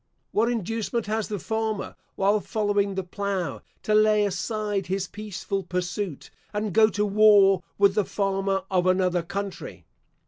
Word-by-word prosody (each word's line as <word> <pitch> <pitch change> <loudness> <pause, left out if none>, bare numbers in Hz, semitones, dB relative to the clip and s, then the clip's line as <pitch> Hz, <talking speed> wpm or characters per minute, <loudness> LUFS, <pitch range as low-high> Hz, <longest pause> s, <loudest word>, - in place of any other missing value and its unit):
What 225 +3 +2
inducement 225 +1 -2
has 215 0 -1
the 210 - -3
farmer, 220 +1 -3 0.2
while 200 +2 +2
following 205 -2 0
the 190 - -2
plough, 190 -4 -3 0.2
to 215 - 0
lay 215 -1 +4
aside 205 0 -2
his 190 +1 -2
peaceful 200 -1 -4
pursuit, 180 -2 -4 0.2
and 210 -2 -2
go 220 0 +6
to 210 -1 0
war 200 -2 +5 0.2
with 200 -1 +4
the 210 0 +2
farmer 195 -1 -1
of 180 -1 +2
another 185 -1 +2
country? 195 +3 -6
200 Hz, 145 wpm, -25 LUFS, 190-215 Hz, 0.2 s, go